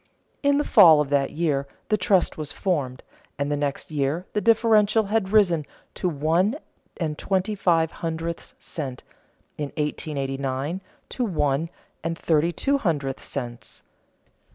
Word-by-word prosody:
In 285 0 +3
the 295 - +2
fall 175 - +7
of 145 -1 -1
that 140 -1 +2
year 150 -4 -1 0.2
the 215 - +4
trust 190 -2 +2
was 150 -2 -5
formed; 140 -9 -2 0.3
and 140 +1 -1
the - - +2
next 145 +1 -3
year 150 +4 -1
the 210 - 0
differential 220 -1 +4
had 205 -4 +1
risen 180 -7 +4 0.3
to 180 - -1
one 165 - +1 0.4
and 155 -4 -3
twenty 190 +2 0
five 165 -5 +2
hundredths 165 0 -5
cents, 135 -6 -6 0.6
in 150 - 0
1889 140 +1 -2 0.3
to 250 - -2
one 155 - 0 0.3
and 165 0 -2
thirty 165 +1 +2
two 280 +9 +1
hundredths 145 - -2
cents. 120 -3 -6
165 Hz, 140 wpm, -24 LUFS, 145-190 Hz, 0.6 s, fall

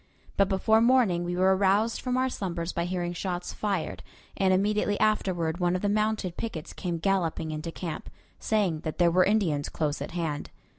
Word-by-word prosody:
But 195 -1 +3
before 220 +3 +3
morning 230 -8 +4
we 175 0 -2
were 190 +1 +4
aroused 200 +4 +2
from 250 -1 -1
our 260 0 +2
slumbers 175 -8 -3
by 170 - -1
hearing 175 -1 -2
shots 180 0 -4
fired, 185 - -2 0.3
and 190 -1 +2
immediately 205 +2 +1
afterward 185 -6 +1
one 175 0 +2
of 185 - -3
the 205 - +2
mounted 210 -4 0
pickets 175 -9 -5
came 175 -2 -3
galloping 165 -3 0
into 155 +2 -4
camp, 165 -1 -6 0.3
saying 200 -8 +1
that 155 0 -5
there 175 -1 +4
were 185 +2 +5
Indians 180 -9 +1
close 150 -2 -2
at - - -4
hand. 155 -4 -3
185 Hz, 185 wpm, -27 LUFS, 170-205 Hz, 0.3 s, were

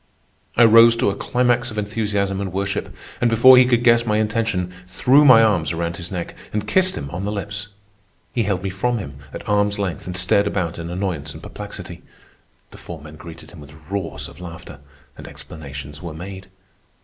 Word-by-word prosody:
I 120 - +7
rose 115 +1 +7
to 110 - +1
a - - -5
climax 120 +2 +1
of 110 - -9
enthusiasm 100 -2 -1
and 95 -2 -4
worship, 95 +1 -3 0.3
and, 120 - +3
before 120 +3 +8
he 125 0 +6
could 120 -1 +2
guess 120 -1 +5
my 105 -2 0
intention, 110 -4 -1
threw 130 +10 +4
my 125 -5 +8
arms 95 -8 +2
around 85 0 -3
his 85 -1 -7
neck 90 -3 -5 0.2
and 105 0 -3
kissed 185 +9 +2
him 70 - -6
on 90 +3 -5
the 105 - -2
lips. 105 0 -5 0.7
He 120 - +1
held 100 -4 -1
me 95 - -2
from 120 +6 -1
him 70 -10 -7
at - - -9
arm's 105 0 +1
length 95 -6 -4
and 90 0 -3
stared 100 +2 +3
about 85 -3 -2
in 85 0 -6
annoyance 90 -6 -3
and 80 - -11
perplexity. - - -9 0.7
The - - -13
four 85 -2 -8
men 75 +1 -12
greeted 80 +1 -12
him 85 - -13
with 75 +1 -13
roars 100 -4 -4
of - - -14
laughter, 85 -4 -10 0.4
and - - -9
explanations 75 -1 -9
were 85 -3 -7
made. 95 +3 -8
100 Hz, 195 wpm, -21 LUFS, 85-115 Hz, 0.7 s, before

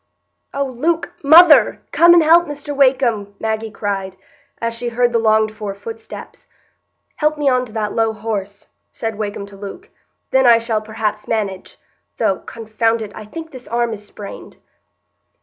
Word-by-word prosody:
"Oh, 280 0 -1
Luke—mother—come 330 +4 +4
and 340 - +6
help 335 +2 +5
Mr 290 0 -6
Wakem!" 250 -7 +2
Maggie 220 0 -2
cried, 195 -3 -4 0.4
as 230 0 -2
she 240 +1 -3
heard 240 +1 +1
the 235 - +2
longed 220 -1 +3
for 210 -2 -6
footsteps. 450 - -10 0.7
"Help 305 0 +1
me 295 -1 -1
on 255 -1 +2
to 215 - -15
that 215 -2 -2
low 225 -1 +1
horse," 205 -2 -5 0.2
said 225 -2 -5
Wakem 205 -1 -4
to 200 0 -14
Luke, 205 - -10 0.4
"then 265 -1 +4
I 235 -1 +7
shall 230 -2 -1
perhaps 215 -1 -4
manage; 200 -4 -3 0.4
though—confound 225 0 -1
it—I 215 0 -9
think 325 +8 -9
this 255 -2 -11
arm 235 -1 -1
is 210 -1 -9
sprained." 205 -1 -11
225 Hz, 150 wpm, -18 LUFS, 210-270 Hz, 0.7 s, I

